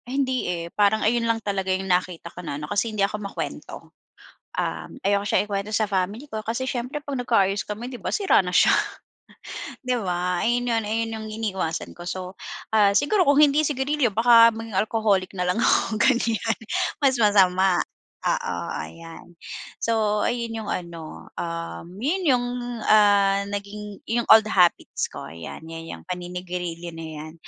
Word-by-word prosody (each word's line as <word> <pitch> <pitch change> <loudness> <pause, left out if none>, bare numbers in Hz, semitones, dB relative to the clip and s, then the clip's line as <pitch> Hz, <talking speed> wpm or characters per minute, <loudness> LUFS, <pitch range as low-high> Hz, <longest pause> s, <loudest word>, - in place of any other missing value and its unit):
Hindi, 260 -4 -1
eh, 170 -1 -3
parang 210 +1 +3
ayun 230 +1 +2
lang 230 0 +2
talaga 195 -2 -1
yung 190 +1 0
nakita 180 -2 -1
ko 180 - -8
na 150 -5 -5
ano 150 - -5
kasi 205 +9 0
hindi 210 -2 +1
ako 210 +1 -4
makwento, 200 -1 -6 0.7
um, - - -3
ayoko 200 +1 +1
siyang 205 - +2
ikwento 200 +1 -3
sa 215 0 +1
family 200 +8 -2
ko 215 -4 -5
kasi 235 +4 -2
siyempre 250 +4 -3
'pag 285 -2 -5
nagka-ayos 205 -6 +1
kami 215 +4 -5
'di 255 - -7
ba - - -5
sira 390 - +3
na 180 - -4
siya. - - +5 1.1
'Di 255 -1 -1
ba 180 0 -1
ayun 245 +1 +1
yun, 225 -2 +1
ayun 225 +1 -1
yung 220 0 -6
iniiwasan 190 -7 -3
ko 175 - -9
so, 185 +1 -5 0.4
ah, 205 -2 +5
siguro 325 - +3
kung 285 +1 +5
hindi 300 +1 +5
sigarilyo 275 -3 0
baka 230 +1 +7
maging 225 -2 -6
alcoholic 210 -2 +1
na 180 -2 -2
lang 180 - +1
ako 225 -1 +2
ganyan 230 -1 +2 0.4
mas 270 -3 +3
masama, 190 -4 +4 0.5
oo, - - -1 0.2
ayan. 165 - -9 0.5
So 215 -2 +1
ayun 230 -2 -3
yung 215 - -7
ano, 170 -3 -6
um, 170 0 -5
yun 295 - 0 0.2
yung, 245 - -2 0.4
ah, 200 -2 +4
naging 205 0 -6
yung 235 +1 -1
old 220 0 +8
the 215 - -4
habits 180 -2 +2
ko - - -8
yan 85 - -9
yang 165 0 -8
paninigarilyo 180 -1 -5
na 165 0 -7 0.2
yan. - - -11
210 Hz, 165 wpm, -24 LUFS, 180-230 Hz, 1.1 s, old